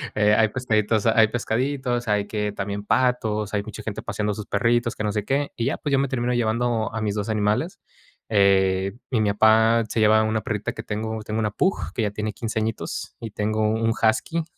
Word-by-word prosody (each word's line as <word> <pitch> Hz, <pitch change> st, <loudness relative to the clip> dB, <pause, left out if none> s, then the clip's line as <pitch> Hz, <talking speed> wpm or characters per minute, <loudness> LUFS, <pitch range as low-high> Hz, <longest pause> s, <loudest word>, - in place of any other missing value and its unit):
hay 105 Hz, +1 st, +4 dB
pescaditos 110 Hz, -3 st, 0 dB
hay 110 Hz, 0 st, +5 dB
pescaditos. 120 Hz, +1 st, -1 dB
Hay 105 Hz, -1 st, +1 dB
que 105 Hz, -1 st, -2 dB
también 100 Hz, 0 st, -4 dB
patos, 110 Hz, -4 st, 0 dB
hay 100 Hz, -, 0 dB
mucha 110 Hz, +1 st, -8 dB
gente 105 Hz, -2 st, -5 dB
paseando 105 Hz, 0 st, -2 dB
a -, -, -8 dB
sus 105 Hz, -, -6 dB
perritos, 120 Hz, 0 st, +1 dB
que 110 Hz, -, -4 dB
no 105 Hz, -, 0 dB
sé 105 Hz, -1 st, -1 dB
qué, 140 Hz, +3 st, 0 dB
y 115 Hz, -, -2 dB
ya, 135 Hz, -, 0 dB
pues, 145 Hz, -, -4 dB
yo -, -, +5 dB
me 140 Hz, -, +1 dB
termino 125 Hz, -2 st, -1 dB
llevando 115 Hz, -1 st, 0 dB
a 115 Hz, -, -3 dB
mis 105 Hz, -1 st, -1 dB
2 105 Hz, +1 st, -3 dB
animales. 110 Hz, -, 0 dB, 0.5 s
Eh, 95 Hz, -2 st, +3 dB, 0.2 s
y 115 Hz, -3 st, +2 dB
mi 105 Hz, -, +2 dB
papá 110 Hz, +2 st, +4 dB
se 115 Hz, -, -2 dB
lleva 110 Hz, 0 st, +5 dB
una 110 Hz, 0 st, 0 dB
perrita 105 Hz, -1 st, -3 dB
que 110 Hz, -, -7 dB
tengo, 110 Hz, +1 st, -4 dB
tengo 110 Hz, +1 st, -3 dB
una 105 Hz, -1 st, 0 dB
pug, 190 Hz, -, -1 dB
que 115 Hz, -, 0 dB
ya 105 Hz, -, 0 dB
tiene 105 Hz, 0 st, -3 dB
15 110 Hz, +1 st, -3 dB
añitos, 110 Hz, 0 st, -4 dB
y 115 Hz, -3 st, -7 dB
tengo 110 Hz, +1 st, -1 dB
un 115 Hz, +1 st, +1 dB
husky 115 Hz, +9 st, 0 dB
110 Hz, 215 wpm, -23 LUFS, 105-115 Hz, 0.5 s, hay